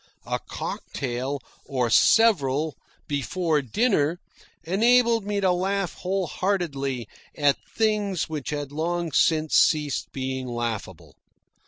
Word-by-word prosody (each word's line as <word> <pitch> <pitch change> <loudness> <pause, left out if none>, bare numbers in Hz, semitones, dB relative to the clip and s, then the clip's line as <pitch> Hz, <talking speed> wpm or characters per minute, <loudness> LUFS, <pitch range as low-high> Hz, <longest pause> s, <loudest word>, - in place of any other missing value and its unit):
A - - -2
cocktail, 130 +2 -4 0.2
or 125 -4 -1
several, 155 - +4 0.3
before 150 +2 0
dinner, 165 - +1 0.4
enabled 230 +3 +3
me 205 -1 0
to 190 -2 +3
laugh 190 +1 -1
whole 190 +1 -2
heartedly 140 - -2 0.3
at 145 -2 +3 0.2
things 210 -5 +1
which 155 -4 -5
had 145 -2 -4
long 170 +2 -2
since 155 +1 +2
ceased 150 -2 +2
being 130 -1 -3
laughable. 115 -7 -4
155 Hz, 110 wpm, -25 LUFS, 135-195 Hz, 0.4 s, several